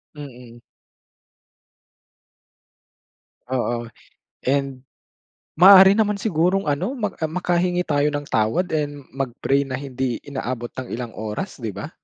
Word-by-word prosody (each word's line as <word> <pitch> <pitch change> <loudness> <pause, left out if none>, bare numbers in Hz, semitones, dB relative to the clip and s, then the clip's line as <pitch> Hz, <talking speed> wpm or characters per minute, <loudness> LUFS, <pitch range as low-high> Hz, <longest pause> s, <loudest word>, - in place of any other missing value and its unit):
Mm. 125 -5 -11 2.9
Oo, 120 -2 -2 0.6
and 135 -1 -1 0.7
maaari 190 +2 +9
naman 210 -1 +2
sigurong 180 -2 +1
ano, 180 - -1
mak 210 -7 -4
ah, 160 - 0
makahingi 180 +2 0
tayo 145 -4 +1
ng 145 0 -3
tawad 115 +13 +1
and 145 -2 -2
mag-pray 135 +1 -1
na 130 - -5
hindi 130 -2 -3
inaabot 130 -4 -5
ng 130 - -7
ilang 120 0 -5
oras, 110 - -5
'di 110 -6 -5
ba? - - -7
140 Hz, 115 wpm, -22 LUFS, 125-180 Hz, 2.9 s, maaari